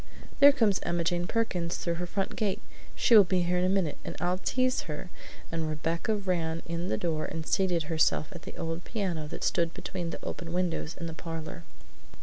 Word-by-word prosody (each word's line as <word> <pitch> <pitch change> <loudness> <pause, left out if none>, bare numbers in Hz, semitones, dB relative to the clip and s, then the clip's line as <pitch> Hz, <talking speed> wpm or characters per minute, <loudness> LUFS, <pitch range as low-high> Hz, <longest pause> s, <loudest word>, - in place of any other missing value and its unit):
"There 285 +1 +10
comes 225 -8 +3
Emma 170 0 0
Jane 175 +1 0
Perkins 180 -7 0
through 170 - -1
her 175 - -2
front 195 +2 -2
gate; 205 -3 0 0.4
she 235 - +5
will 210 - +11
be 180 -1 +1
here 180 +1 +1
in - - +1
a 185 - +3
minute, 190 -6 +1
and - - -5
I'll 180 +3 0
tease 255 +4 +1
her!" 150 +4 -5 0.4
and 165 -1 -1
Rebecca 165 +7 0
ran 170 -5 -1
in 170 +1 -3
the 110 - 0
door 155 0 -1
and 160 0 -4
seated 180 -3 +2
herself 155 0 +2
at 170 -4 -8
the - - -9
old 165 +1 -3
piano 180 -9 -2
that - - -6
stood 170 -1 +1
between 175 -3 -4
the - - -7
open 170 -1 -5
windows 175 -2 -1
in 170 - -4
the 165 - -4
parlor. 165 0 -6
175 Hz, 205 wpm, -29 LUFS, 165-190 Hz, 0.4 s, will